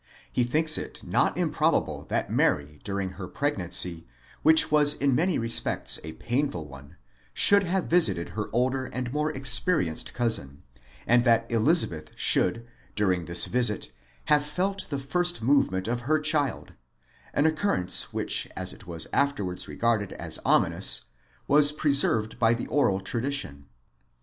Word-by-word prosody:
He 125 - +2
thinks 155 +6 +1
it - - -8
not - - 0
im - - 0
probable - - 0
that - - -2
Mary 75 0 0
during 100 -2 -3
her 95 -1 -8
pregnancy, 90 - -2 0.3
which 160 0 +5
was 150 -1 +5
in 140 -1 +1
many 175 +6 +1
respects 115 0 0
a 80 0 -7
painful 120 - -3
one, 70 +3 -14 0.4
should 200 0 +5
have 185 +1 -1
visited 105 - +2
her 105 +4 -5
older 130 +3 0
and 125 -1 -5
more 150 +1 0
experienced 135 - +1
cousin, 90 - -1 0.4
and 120 0 +3
that 115 -1 +3
Elizabeth 115 - +1
should 115 +6 +1 0.3
during 95 -5 0
this 85 +2 0
visit 115 - 0 0.3
have 150 -1 +3
felt 190 +6 -3
the 140 - -3
first 175 +2 -2
movement 110 -8 +1
of 120 +1 -1
her 150 +6 0
child: 150 -2 -1 0.6
an 145 - +1
occurrence 155 - +1
which - - 0
as 95 0 -4
it 100 - -15
was 85 -2 -1
afterwards 135 -11 -1
regarded 115 -4 -1
as - - -5
ominous, - - +2 0.5
was 145 +1 +5
preserved 140 -7 +2
by 115 0 +3
the 120 - -5
oral 100 -10 +1
tradition. 115 - -4
120 Hz, 145 wpm, -26 LUFS, 95-150 Hz, 0.6 s, which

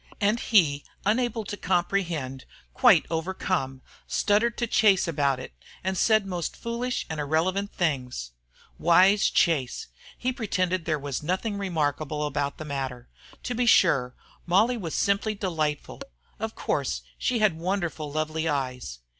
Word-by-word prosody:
And 210 +3 +2
he, 155 -13 +3 0.2
unable 230 +1 +1
to 205 - -5
comprehend, 175 -8 -1 0.3
quite - - +5
overcome, 160 -5 -2 0.2
stuttered 225 +3 +2
to 240 - 0
Chase 210 -5 +4
about 140 -4 +1
it, 125 - -9 0.3
and 190 +1 -1
said 215 +2 +3
most 175 -4 -4
foolish 240 +2 -3
and 160 -1 -5
irrelevant 175 +7 0
things. 125 - -2 0.5
Wise 185 +5 +5
Chase! 145 -8 +1 0.3
He 255 +1 -1
pretended 185 -7 -1
there 155 -2 +1
was 140 -2 -4
nothing 190 +7 -1
remarkable 150 -5 -1
about 145 -1 -2
the 155 - -7
matter. 130 -4 -4 0.3
To 250 - -2
be 245 +1 0
sure, 125 - +4 0.3
Molly 210 +8 +4
was 175 -9 -4
simply 200 +2 +1
delightful. 155 -7 -2 0.4
Of 220 +1 -4
course - - -2 0.2
she 250 - +1
had 215 -5 +3
wonderfully 170 -4 -2
lovely 155 +1 -1
eyes. 125 - -3
175 Hz, 140 wpm, -26 LUFS, 145-205 Hz, 0.5 s, quite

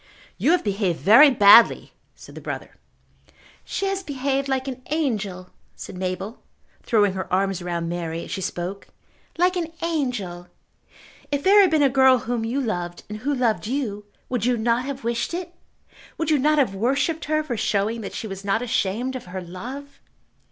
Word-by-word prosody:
"You - - +2
have 360 - +1
behaved 195 -4 -1
very 235 +9 +8
badly," 225 -2 +6 0.2
said - - -14
the - - -9
brother. - - -6 0.9
"She 395 - -3
has 390 0 -1
behaved 275 -3 -2
like 265 0 -1
an 260 -1 -5
angel," 210 - -2 0.2
said - - -9
Mabel, 185 +4 -4 0.4
throwing 205 -4 +2
her 190 0 -5
arms 190 0 0
round 170 -1 -3
Mary 170 -1 -4
as - - -10
she 195 - -3
spoke, 180 +2 -5 0.5
"like 360 +2 +3
an 335 -2 -2
angel. 245 - -2 0.8
If 285 0 -1
there 405 +2 +7
had 380 - +5
been 310 -2 +3
a - - +6
girl 265 0 +5
whom 235 0 -3
you 235 +5 -1
loved 175 -9 -3
and 210 0 -6
who 285 +5 -1
loved 235 -4 0
you, 225 -6 -3 0.2
would 245 -4 -2
you 245 0 +2
not 235 +2 +1
have 275 -1 -6
wished 235 +7 -2
it? 350 -1 -6 0.6
Would 325 -1 -1
you 300 - +3
not 305 +3 +3
have 260 -9 +2
worshipped 275 - 0
her 310 0 0
for 270 -6 -3
showing 220 +1 0
that 195 - -7
she - - -5
was 195 -2 -7
not 200 +4 0
ashamed 240 +3 -1
of 255 - -6
her 185 +1 -6
love?" 245 +11 -9
235 Hz, 180 wpm, -23 LUFS, 195-280 Hz, 0.9 s, very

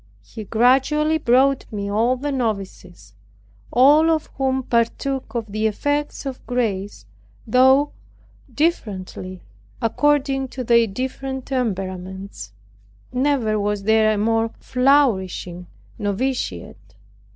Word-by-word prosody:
He 220 -2 -9
gradually 270 +8 +2
brought 265 +1 +2
me 200 -2 -4
all 230 +5 +1
the 290 +3 -3
novices, 195 - -4 0.6
all 290 +6 +5
of 315 -2 0
whom 265 -1 0
partook 250 +3 -1
of 225 -3 -3
the 215 +1 0
effects 290 +8 -2
of 265 -2 -6
grace, 205 - -2 0.4
though 265 +5 +4 0.6
differently, 190 - -3 0.4
according 270 +2 +1
to 255 0 -6
their 235 -1 +4
different 260 +4 -5
temperaments. 190 - -4 0.6
Never 250 -5 +1
was 205 0 -1
there 220 +1 +3
a - - -2
more 225 +2 +1
flourishing 210 -10 +1 0.3
noviciate. 235 +6 -3
240 Hz, 105 wpm, -21 LUFS, 205-270 Hz, 0.6 s, all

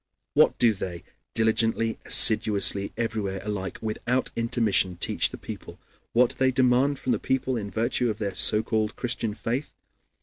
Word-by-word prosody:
What - - +4
do 115 -2 +4
they, 90 -3 -6 0.3
diligently, 115 0 +1
assiduously, 100 -3 +3
everywhere 110 -4 -2
alike, 100 -3 -4
without 120 +4 -1
intermission, 115 -6 +1
teach - - +1
the - - -8
people? - - -9 0.4
What 125 +1 +4
do - - -9
they 130 0 +4
demand 130 +2 +2
from 130 - -2
the - - +1
people 130 0 -1
in 105 -3 -4
virtue 120 +3 0
of 105 - -3
their 100 -3 -3
(so 105 +3 +2
called) 110 0 -1
Christian 120 -3 -2
faith? 125 +6 -3
115 Hz, 160 wpm, -26 LUFS, 105-125 Hz, 0.4 s, What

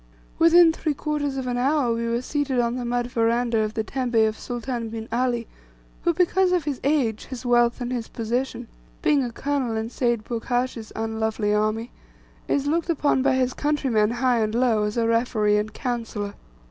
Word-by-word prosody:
Within 335 0 +7
three 310 -2 -2
quarters 290 -2 -2
of 260 - -3
an 245 -1 -1
hour 265 -1 +2
we 230 0 -2
were 235 +1 -1
seated 285 -2 -1
on 235 0 +1
the 250 -1 -3
mud 245 0 -1
veranda 230 0 +1
of 215 0 -1
the 220 - 0
tembe 250 0 -3
of 215 - -2
Sultan 240 -1 -4
bin 225 0 -6
Ali, 240 -1 0 0.6
who, 345 - +3
because 360 +2 +2
of 360 -3 +2
his 285 -3 -3
age, 265 -7 +1
his 255 -1 -8
wealth, 240 0 +3
and 245 -2 -3
position 240 +1 -2 0.4
being 290 -3 +3
a 240 - -3
colonel 265 -2 -1
in 220 +1 -3
Seyd 235 -4 0
Burghash's 245 -1 -2
unlovely 220 -1 -1
army 215 +3 0 0.6
is 280 -1 +1
looked 330 +4 0
upon 290 -4 +2
by 270 0 +3
his 255 0 +1
countrymen, 265 -8 +1
high 245 0 +1
and 215 0 0
low, 235 -3 +2
as 210 +2 -3
referee 230 -2 +2
and 210 +1 -1
counsellor. 225 -4 -4
245 Hz, 180 wpm, -24 LUFS, 225-270 Hz, 0.6 s, Within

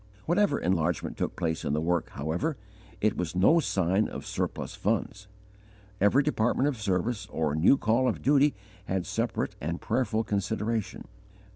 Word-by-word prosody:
Whatever 175 -2 +2
enlargement 85 -2 0
took - - -3
place 80 -2 -2
in 70 - -1
the 75 - +1
work, 85 +1 0
however, 85 - -2 0.4
it 110 -1 +2
was 90 -1 -3
no 100 - +5
sign 95 - +1
of - - -7
surplus - - -3
funds. 100 +1 -2 0.7
Every 105 +8 +4
department 130 -1 +1
of 130 -7 -2
service 100 +3 -1
or 80 -2 -1
new 80 - +5
call 115 +3 +2
of 120 - -2
duty 145 +1 +4 0.3
had 95 -2 -2
separate - - -2
and 85 +3 -3
prayerful 110 -2 0
consideration. 110 +1 -2
105 Hz, 150 wpm, -28 LUFS, 85-125 Hz, 0.7 s, no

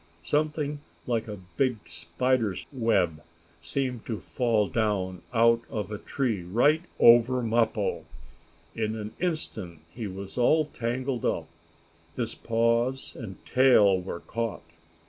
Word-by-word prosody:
Something 150 - 0 0.3
like 115 -2 -1
a 105 -1 -6 0.2
big 130 -4 +2
spider's 95 +6 -1
web 95 - +1 0.4
seemed 125 +7 -2
to 115 - -2
fall 115 -3 0
down 95 -5 -1
out 115 0 +4
of 105 -1 -4
a 105 - -4
tree 120 -9 -1
right 120 - +3 0.2
over 120 +2 +6
Mappo. 110 -2 0 0.7
In 110 -1 -2
an 105 -1 -6
instant 115 - -2 0.2
he 115 -3 -5
was 100 +4 -7
all 155 +6 +4
tangled 125 -1 -3
up - - 0 0.7
his - - -2
paws 115 +3 0
and 105 -6 -9
tail 105 -8 +5
were 90 -1 -6
caught. 115 -1 -4
115 Hz, 125 wpm, -27 LUFS, 105-125 Hz, 0.7 s, over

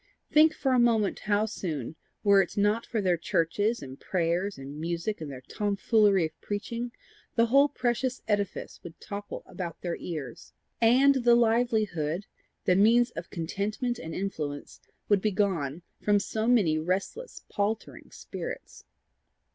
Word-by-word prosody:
Think 310 +1 +6
for 265 - 0
a 250 - +4
moment 225 -4 +2
how 210 0 +1
soon, 160 - -4 0.3
were 200 -2 +6
it 190 - -4
not 210 +3 +2
for 225 - -1
their 180 -3 +2
churches 185 +6 0
and 135 +1 -9
prayers 180 +2 -1
and 140 +2 -8
music 170 +5 -3
and 155 - -5
their 130 -2 -8
tomfoolery 205 -2 +2
of 160 0 -9
preaching, 230 +4 -4 0.4
the 230 - +5
whole 275 +5 +5
precious 255 -1 -1
edifice 205 -3 -2
would 170 -2 -11
topple 205 0 -7
about 175 -3 -6
their 175 -2 -2
ears, 150 -8 -7 0.3
and 260 +3 +5
the 240 0 +6
livelihood, 215 -8 +1 0.4
the 180 - +4
means 230 +5 +5
of - - -7
contentment 205 +8 -2
and 165 0 -6
influence, 155 -7 -4 0.3
would 205 -2 +3
be 215 - +2
gone 180 -7 -1 0.2
from 205 -1 +3
so 220 +2 -2
many 195 -11 +4
restless 190 - -3
paltering 210 +2 -3
spirits! - - -8
205 Hz, 145 wpm, -28 LUFS, 170-230 Hz, 0.4 s, Think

